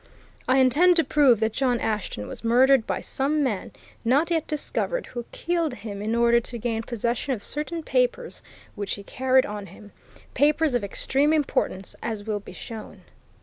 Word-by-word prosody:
I 260 - +4
intend 295 +8 +5
to 330 - +4
prove 275 -9 +4
that 220 0 +1
John 250 -2 +1
Ashton 210 - -3
was - - -8
murdered 250 +1 +4
by - - -2
some 290 +3 0
man 215 -8 -2 0.3
not 280 +9 +2
yet 325 -2 0
discovered, 335 +10 -2
who 240 -1 -7
killed 335 -6 -1
him 205 -3 -7
in 220 +2 -1
order 235 0 +4
to 235 +1 -7
gain 225 -1 -2
possession 235 +4 -2
of 210 -5 -5
certain 320 +3 -3
papers - - 0 0.3
which 205 -1 -3
he 200 - -10
carried 260 +4 +2
on 205 -1 -6
him 205 0 -14 0.4
papers 300 0 +2
of 245 -3 0
extreme 270 +8 +1
importance, 275 -10 -1
as 220 -3 -4
will 210 -1 -2
be 200 - -12
shown. 220 +4 -9
250 Hz, 175 wpm, -25 LUFS, 220-295 Hz, 0.4 s, intend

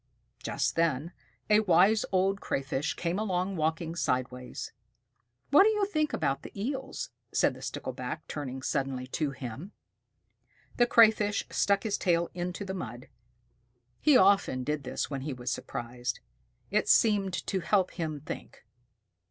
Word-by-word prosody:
Just - - -1
then 165 -1 +1 0.4
a 210 0 +5
Wise 205 +2 +4
Old 195 +1 +2
Crayfish 135 +2 -2
came 175 +3 -1
along 190 -2 -1
walking 160 0 -1
sidewise. 125 -5 -2 0.8
"What 290 - +8
do 415 - +6
you 420 -2 +1
think 310 -6 0
about 135 - 0
the - - -10
Eels?" 265 +4 -4 0.2
asked - - +3
the - - -12
Stickleback, - - -5
turning 135 -3 -5
suddenly 135 -3 -1
to 145 +3 -1
him. 140 - -7 1.0
The 240 - +4
Crayfish 215 -3 +4
stuck 200 0 +2
his 215 -3 -1
tail 170 -2 +1
into 180 +3 -4
the 190 - -4
mud. 125 - -7 0.9
He 295 -4 +6
often 190 - +4
did 150 0 -2
this 130 - -3
when 135 -2 -3
he 140 +1 -3
was 125 0 -4
surprised. 120 -1 -4 0.5
It - - +1
seemed 200 -4 +4
to 190 - -1
help 185 0 +2
him 155 -4 -4
think. - - -8
170 Hz, 145 wpm, -29 LUFS, 135-205 Hz, 1.0 s, What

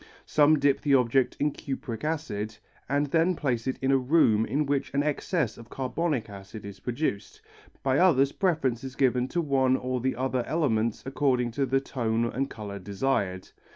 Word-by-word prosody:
Some 150 +1 +4
dip 140 -1 +2
the 140 -2 +3
object 125 0 +2
in 150 +1 +2
cupric 135 -4 -6
acid 115 -9 -3 0.3
and 145 +1 +2
then 165 +3 +3
place 125 -6 -1
it 130 - -1
in 135 - +3
a 135 - +4
room 125 -6 +3
in 145 +6 0
which 140 -1 -1
an 140 - +2
excess 150 - -1
of 115 - -13
carbonic 135 0 -2
acid 100 +1 -10
is 100 -1 -9
produced, 120 -6 -3 0.4
by 135 0 +2
others 140 -7 +4
preference 140 - 0
is 130 -1 -7
given 125 -2 +2
to 170 +6 -1
one 135 -4 +2
or 125 -1 -2
the 130 +1 0
other 130 -1 -1
element 115 -9 0
according 130 -3 +1
to 135 +4 -1
the 135 +2 +2
tone 115 -4 -1
and 135 +4 -2
colour 100 -4 -7
desired. 100 -2 -2
130 Hz, 180 wpm, -27 LUFS, 115-145 Hz, 0.4 s, Some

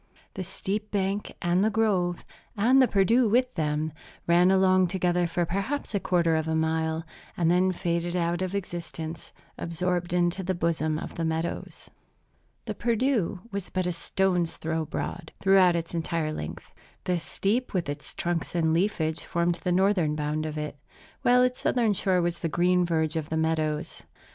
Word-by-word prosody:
The 185 - -4
steep 200 +3 -4
bank, 200 0 -1
and 175 +2 +2
the 215 - +3
grove, 195 -6 0 0.3
and 250 +6 +5
the 260 - +5
Perdu 225 +4 +3
with 250 +3 +2
them, 155 -1 -1 0.3
ran 175 +2 +5
along 185 -1 +4
together 180 -1 +1
for 170 +1 0
perhaps 200 - -3
a 200 - +1
quarter 170 -3 +2
of 160 0 -1
a 160 - 0
mile, 160 0 0 0.3
and 170 -1 +3
then 185 +1 +3
faded 170 0 -2
out 170 0 0
of 185 +1 -2
existence, 170 -3 -5 0.3
absorbed 175 +1 -1
into 175 +1 +1
the 185 0 -1
bosom 160 -2 0
of - - -6
the 165 - -3
meadows. 160 +1 -3 0.7
The - - -3
Perdu 235 -6 0
was 200 -2 -4
but 185 -1 -1
a 180 - 0
stone's 175 0 0
throw 160 0 -2
broad, 160 +2 -5
throughout 190 -2 +5
its 165 0 -3
entire 165 -2 -1
length. 75 - -7 0.3
The 180 -1 0
steep 215 +9 -1
with 180 -6 -1
its 145 +1 -6
trunks 175 0 -2
and 160 -2 +2
leafage 165 -3 0
formed 170 0 -1
the 180 - 0
northern 180 -4 +2
bound 150 +1 -2
of 155 0 -5
it; 150 -1 -4 0.4
while 250 +1 +5
its 250 0 0
southern 230 -4 +2
shore 185 -2 +1
was 170 0 -1
the 165 - -2
green 180 +2 +2
verge 160 -1 0
of 155 -2 -3
the 160 - -1
meadows. 160 0 -1
175 Hz, 175 wpm, -27 LUFS, 160-190 Hz, 0.7 s, and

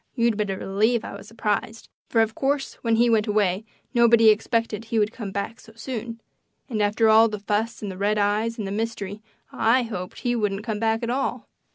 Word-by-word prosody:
You'd 235 -3 +2
better 205 -2 -2
believe 215 +5 +1
I - - -7
was 200 0 -11
surprised, 220 0 -3 0.2
for, 225 - +3
of 220 0 +1
course, 275 +3 -1
when 230 -1 +2
he 235 +2 +4
went 225 -2 +2
away 205 -1 +1 0.3
nobody 235 -2 +6
expected 225 0 0
he 225 0 -2
would 210 0 +2
come 215 -5 -6
back 200 +3 -4
so 225 - -16
soon; 230 -1 -6 0.5
and 225 -6 -2
after 210 +2 +2
all 220 +1 +6
the 210 - -4
fuss 210 +3 -2
and 200 - -3
the 185 - -9
red 210 +1 +1
eyes 210 +3 +1
and 215 - -3
the 195 - -4
mystery 210 -1 -4 0.3
I 245 +3 +3
hoped 185 -6 -6
he 245 -1 0
wouldn't 210 -3 -1
come 215 -2 -3
back 225 +1 0
at 235 - -1
all. 270 +2 -2
220 Hz, 210 wpm, -24 LUFS, 205-230 Hz, 0.5 s, nobody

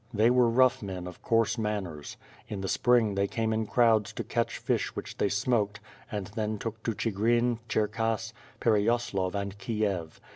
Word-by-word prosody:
They 110 +1 +4
were 125 -1 +4
rough 130 +2 +4
men 95 -3 -5
of 90 -1 -9
coarse 115 +1 +2
manners. 95 -9 -3 0.3
In 100 -2 -5
the 95 - -3
spring 120 -1 +3
they 100 0 +1
came 110 +1 -1
in 110 0 -1
crowds 110 -4 +3
to - - -4
catch - - -1
fish - - -1
which - - -6
they 100 - +2
smoked, 105 0 0 0.3
and 105 -2 -3
then 110 -1 -2
took 110 +1 -5
to 115 - 0
Chigrin, 115 +3 +1
CherLass, 115 +1 0 0.3
Per 110 -3 +3
cyaslav 100 -4 0
and 100 0 -3
Kiev. 100 -5 -2
110 Hz, 175 wpm, -29 LUFS, 100-115 Hz, 0.3 s, They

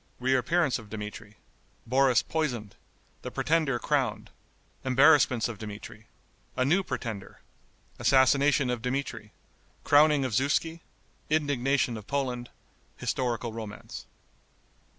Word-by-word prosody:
Reappearance 130 +4 +1
of 110 -3 -13
Dmitri. 105 0 -8 0.5
Boris 130 +1 +3
Poisoned. 120 -11 -3 0.5
The - - -6
Pretender 155 -5 +1
Crowned. - - -1 0.5
Embarrassments 130 -2 +4
of 115 -4 -7
Dmitri. 110 +1 -9 0.5
A 130 - +2
New 175 +8 +3
Pretender. 110 - -6 0.6
Assassination 135 0 +3
of 120 -2 -3
Dmitri. 125 -4 -4 0.5
Crowning 145 -1 +4
of 125 - -3
Zuski. 145 +7 0 0.5
Indignation 140 -5 +1
of 105 - -11
Poland. 125 -3 -2 0.5
Historical 120 -2 -2
Romance. 110 -2 -8
130 Hz, 100 wpm, -28 LUFS, 115-140 Hz, 0.6 s, Embarrassments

